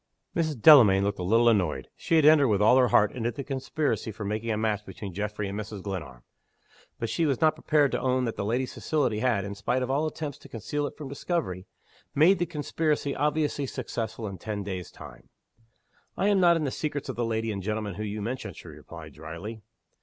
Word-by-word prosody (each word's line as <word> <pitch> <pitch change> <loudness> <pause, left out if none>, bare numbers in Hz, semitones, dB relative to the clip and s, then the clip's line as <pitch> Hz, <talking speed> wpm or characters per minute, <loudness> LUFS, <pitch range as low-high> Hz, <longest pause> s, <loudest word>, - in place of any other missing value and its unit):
Mrs. 155 -6 -1
Delamayn 110 -9 +8
looked 100 0 -1
a - - -2
little 115 +6 +3
annoyed. 90 - +1
She 165 - -1
had 155 -2 +5
entered, 150 -2 +7
with 105 -4 +2
all 110 +4 +5
her 125 -1 +5
heart, 105 -1 +4
into 120 -1 -2
the 140 +3 -6
conspiracy 135 -2 -2
for 105 0 -7
making 110 +3 -3
a 110 - 0
match 105 -1 -1
between 95 -1 -8
Geoffrey 105 +1 -3
and 100 +2 -4
Mrs. 105 -2 -7
Glenarm. 75 -12 -6 0.7
But 115 - -3
she 165 +7 0
was 135 -4 0
not 155 -1 +4
prepared 150 -3 +2
to 125 - -1
own 130 0 +1
that 115 - -3
the - - -3
lady's 120 +5 -1
facility 130 -9 0
had 115 -5 +1
(in 100 - -5
spite 120 +6 -1
of 125 - -2
all 150 +3 +1
attempts 150 -2 -5
to - - -15
conceal 145 +6 -3
it - - -10
from 150 - -7
discovery) 135 - -3 0.5
made 170 +6 +5
the 175 - 0
conspiracy 150 -2 -1
obviously 150 -1 0
successful 115 -2 -4
in 95 -3 -6
ten 105 0 -4
days' 95 -3 -5
time. - - -13 0.9
"I 200 - +2
am 200 -2 +3
not 175 -2 +5
in 160 - -2
the 140 - -1
secrets 145 -1 -3
of 130 - -4
the 120 - -1
lady 115 -1 -1
and 100 -2 -4
gentleman 105 0 -3
whom 105 +3 -4
you 105 0 -4
mention," 125 +4 -4
she - - -11
replied, - - -11
dryly. 85 +8 -8
115 Hz, 220 wpm, -27 LUFS, 105-145 Hz, 0.9 s, Delamayn